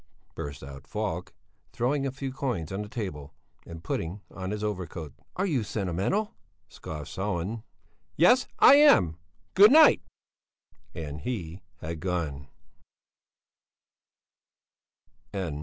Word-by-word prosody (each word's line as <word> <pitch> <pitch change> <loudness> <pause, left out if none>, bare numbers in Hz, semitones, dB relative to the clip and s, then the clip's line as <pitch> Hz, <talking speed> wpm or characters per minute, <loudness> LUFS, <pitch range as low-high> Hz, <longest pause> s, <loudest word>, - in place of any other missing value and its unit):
burst 70 -2 -7
out 70 +1 -10
Falk, 105 -5 -3 0.4
throwing 135 +3 0
a - - -2
few 135 0 -5
coins 120 - -3
on 95 +2 -3
the 105 - -7
table, 80 - -6 0.3
and 85 -1 -9
putting 85 +3 -3
on 95 -1 -5
his 105 +1 -3
overcoat. 90 -7 -4 0.2
"Are 185 - 0
you 150 -10 +1
sentimental?" 100 - -1 0.3
scoffed 75 -4 -8
Sellén. 100 +2 -2 0.6
"Yes, 245 - +5
I 280 - +8
am! 95 - +5 0.4
Good 205 +4 +8
night." 310 +1 +7 0.9
And 75 -2 -6
he 90 -6 -5 0.2
had 80 0 -5
gone. 80 -7 -3
95 Hz, 110 wpm, -27 LUFS, 80-125 Hz, 0.9 s, I